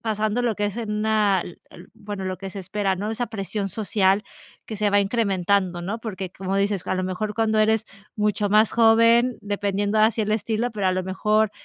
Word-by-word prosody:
pasando 215 +1 -1
lo 235 -3 +1
que 205 +1 -1
es 205 +2 -5
en 220 -3 -3
una 210 -3 +2
el 175 - -11
el - - -14
bueno, 205 -2 -7
lo 185 -1 -4
que 195 0 -7
se 195 0 -7
espera, 195 +1 -1
¿no? 205 +4 -4
Esa 240 +2 -2
presión 200 -2 -4
social 200 0 +1 0.4
que 220 - -6
se 205 0 +1
va 205 - +4
incrementando, 195 -4 0
¿no? 205 +6 -3
Porque, 195 -5 -6
como 190 0 -4
dices, 200 -2 0
a - - 0
lo 185 - -1
mejor 210 +3 -3
cuando 220 -1 +1
eres 220 0 +2 0.3
mucho 210 -1 0
más 215 +1 +4
joven, 230 +2 +4
dependiendo 205 +1 -1
así 220 +1 +3
el 210 0 -1
estilo, 225 +2 -1
pero 205 -3 -2
a 185 - +3
lo 185 0 -1
mejor, 210 +3 +1
210 Hz, 210 wpm, -23 LUFS, 195-220 Hz, 0.4 s, va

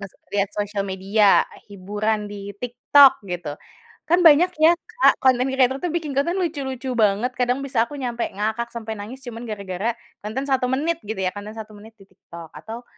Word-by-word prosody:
Mas 195 - -7 0.2
lihat 200 -1 +1
sosial 205 0 -2
media, 195 +2 +3 0.2
hiburan 210 +2 -2
di 205 -1 -7
TikTok 250 +4 +5
gitu, 175 -4 -4 0.6
kan 345 +3 +4
banyak 330 +2 +7
ya 320 +2 +7
Kak, 440 +7 +3
konten 255 -1 +4
kreator 265 0 +2
tuh 350 - -1
bikin 325 -4 -2
konten 340 +6 +1
lucu-lucu 270 -6 -3
banget, 215 +3 +2
kadang 250 +1 0
bisa 255 -4 +1
aku 290 - -8
nyampe 240 -2 -2
ngakak 220 +4 -2
sampai 225 -2 -5
nangis 215 +6 -8
cuman 240 -1 -7
gara-gara 200 +1 -3 0.3
konten 225 +6 -3
1 265 -2 +1
menit 320 +5 0
gitu 210 -1 -4
ya, 185 -1 0
konten 205 +1 -7
1 220 -1 -8
menit 220 +2 -15
di - - -14
TikTok, 170 -3 -12
atau 230 +2 -8
230 Hz, 180 wpm, -22 LUFS, 205-265 Hz, 0.6 s, banyak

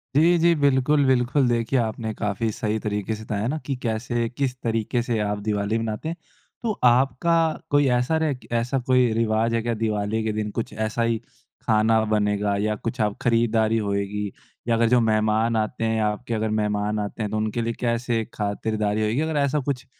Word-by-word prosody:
जी, 170 +4 +5
जी 170 +1 +4
बिल्कुल, 140 0 +3
बिल्कुल। 130 +1 +2
देखिए, 120 +2 +1
आपने 110 -1 -2
काफ़ी 105 +2 -2
सही 110 +1 -2
तरीके 105 0 -2
से 110 - -9
बताया 105 0 -2
ना 150 +5 -1
कि 140 - -2
कैसे, 115 +1 -1
किस 130 +1 -2
तरीके 115 +1 0
से 120 -1 -1
आप 105 0 -1
दिवाली 105 +1 0
मनाते 115 +6 -3
हैं। 165 - -3 0.5
तो 230 - +1
आपका 130 +6 +3 0.3
कोई 145 -1 +3
ऐसा 130 +6 +1
रह 150 -3 +1 0.2
ऐसा 125 +4 0
कोई 125 -2 +4
रिवाज 115 0 +1
है 115 - +1
क्या 120 +1 -1
दिवाली 110 0 -1
के 110 - 0
दिन। 105 0 -2
कुछ 115 - -4
ऐसा 110 +2 -2
ही 115 0 +1 0.5
खाना 110 +1 +4
बनेगा 105 -1 +1
या 105 0 0
कुछ 115 +2 -4
आप 105 -1 0
खरीदारी 115 -1 +2
होएगी 100 -1 -2 0.4
या 115 - +3
अगर 115 0 +3
जो 125 0 +5
मेहमान 110 +1 +2
आते 110 +2 -2
हैं 110 0 +1
आपके 105 +3 -2
अगर 110 0 -1
मेहमान 105 0 -1
आते 105 +2 -4
हैं 105 - -3
तो 110 - -1
उनके 110 +2 -1
लिए 115 0 -1
कैसे 115 -1 0
खातिरदारी 105 0 -1
होएगी 110 +6 +1
अगर 160 -1 -1
ऐसा 140 +1 +1
कुछ 125 -3 -3
115 Hz, 190 wpm, -24 LUFS, 105-125 Hz, 0.5 s, जी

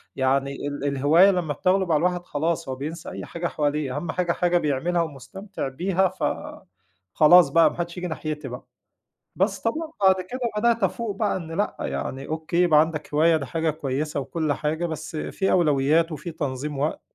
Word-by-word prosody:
يعني 135 +1 0
ال 145 0 -4
الهواية 150 +8 +5
لمّا 170 -5 -1
بتغلب 185 0 +1
على 150 - +4
الواحد 180 0 0
خلاص 165 +1 -2
هو 130 - -2
بينسى 155 +5 -6
أي - - -7
حاجة 170 0 -4
حواليه، 145 -3 -1
أهم 170 - -3
حاجة 180 -1 0
حاجة 175 0 +2
بيعملها 165 +3 0
ومستمتع 170 +5 -6
بيها، 185 +7 +1
فخلاص 95 - +1
بقى، 165 +3 +5
ما - - -10
حدّش 175 +1 -4
ييجي 180 0 -3
ناحيتي 155 -3 -4
بقى، 125 0 -7 0.7
بس 195 +1 0
طبعًا 315 +7 -2
بعد 190 -1 +6
كده 245 +8 -7 0.2
بدأت 230 -1 +2
أفوق 205 +2 -1
بقى 210 -2 0
إن 165 -2 -8
لأ، 205 - -1
يعني 135 +1 -4
أوكي 160 +2 -3
يبقى 160 -4 +5
عندك 155 -1 -1
هواية 160 +2 +4
ده 140 - -5
حاجة 160 +5 -1
كويّسة 145 0 -3
وكلّ 155 +1 -1
حاجة، 155 +4 -2
بس 160 0 -5
فيه 190 +5 -1
أولويات، 155 0 +3
وفيه 155 +3 -6
تنظيم 140 0 -4
وقت، 150 +2 -1
160 Hz, 180 wpm, -24 LUFS, 145-180 Hz, 0.7 s, بعد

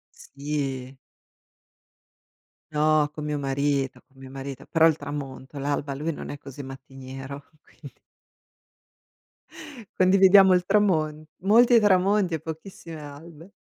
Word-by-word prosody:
Sì. 140 -2 -5 1.7
No, 155 0 +2
co' 150 - -7
mio 150 0 -2
marito, 140 -1 -1
co' 135 - -35
mio 135 0 -12
marito, 135 0 -8
però 165 -1 +4
il 160 -2 +1
tramonto, 140 -1 -7
l'alba 140 0 -2
lui 150 +4 -3
non 150 - -8
è 145 - -6
così 140 0 -10
mattiniero, 135 +1 -9 0.2
quindi 140 -5 -15 2.0
Condividiamo 190 +1 +6
il 180 0 0
tramon 155 -7 +1 0.2
molti 235 +4 +6
tramonti, 195 -2 +2
e 160 - -1
pochissime 160 +1 -9
albe. 155 +4 -12
150 Hz, 115 wpm, -25 LUFS, 135-170 Hz, 2.0 s, Condividiamo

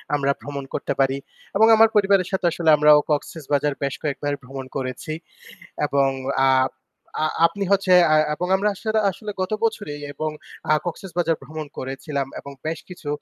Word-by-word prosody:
আমরা 140 -1 +1
ভ্রমণ 140 -1 -6
করতে - - -2
পারি। 135 0 +2 0.4
এবং 220 +2 +6
আমার 225 0 +6
পরিবারের 195 -3 +4
সাথে 190 -1 -1
আসলে 165 -1 0
আমরাও 150 0 +7
Cox's 150 +1 -2
Bazar 145 0 +2
বেশ 140 -1 -1
কয়েকবার 145 0 -2
ভ্রমণ 135 +1 -7
করেছি। 130 +3 -4 0.7
এবং 140 -1 +2 0.4
আ - - +5 0.8
আ - - +3 0.2
আপনি 200 +4 -3
হচ্ছে 195 -2 +3 0.2
আ - - +6 0.2
এবং 180 - -3
আমরা 200 +2 +1
আসরে 220 +2 -1
আসলে 210 +3 -7
গত 185 - -3
বছরেই 205 -10 -2
এবং 155 +2 -3 0.4
আ - - +6
Cox's 175 +2 -6
Bazar 165 -2 +2
ভ্রমণ 155 0 -7
করেছিলাম 135 +1 -3
এবং 140 - -10
বেশ 160 0 -2
কিছু 175 -5 -9
155 Hz, 170 wpm, -23 LUFS, 140-190 Hz, 0.8 s, আমরাও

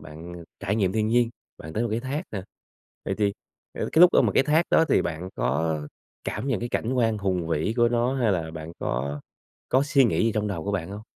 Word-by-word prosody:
bạn 85 +3 -10 0.2
trải 100 +2 -1
nghiệm 95 -4 +1
thiên 110 -1 +1
nhiên, 120 0 +3 0.3
bạn 80 - -9
tới 110 - -1
một 120 - 0
cái 110 +2 -1
thác 135 +5 -3
nè. 100 -3 -4 0.6
Vậy - - -1
thì, 100 -2 +2 0.5
ờ, - - -1
cái 160 - +4
lúc 180 0 +9
á - - +6
mà - - +2
cái - - +5
thác 155 +4 +3
đó 160 - +5
thì - - +4
bạn 85 +2 -4
có 80 +3 0 0.4
cảm - - -3
nhận 130 - 0
cái 120 - -3
cảnh 120 +1 -1
quan 115 -4 +1
hùng 95 -4 -1
vĩ 80 +7 0
của 120 -1 +4
nó 120 +2 +1
hay 120 -6 +2
là 80 -3 -2
bạn 80 0 -8
có 70 +4 -2 0.5
có 130 - +3
suy 145 -2 +4
nghĩ 115 - +2
gì 115 - +2
trong 105 -1 0
đầu 85 -6 -4
của 100 - -2
bạn 95 -2 -2
hông? 105 +1 -7
105 Hz, 245 wpm, -25 LUFS, 85-120 Hz, 0.6 s, lúc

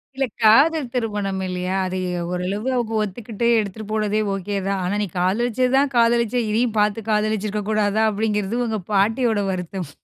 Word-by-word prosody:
இல்ல 270 0 +1 0.2
காதல் 280 +7 +5
திருமணம் 205 -5 -2
இல்லயா! 180 +1 -2
அது 185 0 -3 0.3
ஓரளவு 190 +6 -3
அவுங்க 230 -2 -1
ஒத்துக்கிட்டு 220 +3 -3
எடுத்துட்டு 210 0 -5
போனதே 215 0 0
ஓகே 200 +1 -3
தான். 195 -1 0
ஆனா 180 +3 -1
"நீ - - -2
காதலிச்சது 240 +7 +1
தான் 275 -1 +2
காதலிச்ச 235 0 +3 0.2
இதையும் 225 0 0
பார்த்து 210 +1 0
காதலிச்சிருக்க 210 -1 0
கூடாதா," 215 0 +1
அப்பிடிங்கிறது 210 +2 -1
உங்க 220 -2 -2
பாட்டியோட 220 +2 +2
வருத்தம். 180 -2 -5
215 Hz, 150 wpm, -22 LUFS, 195-230 Hz, 0.3 s, காதல்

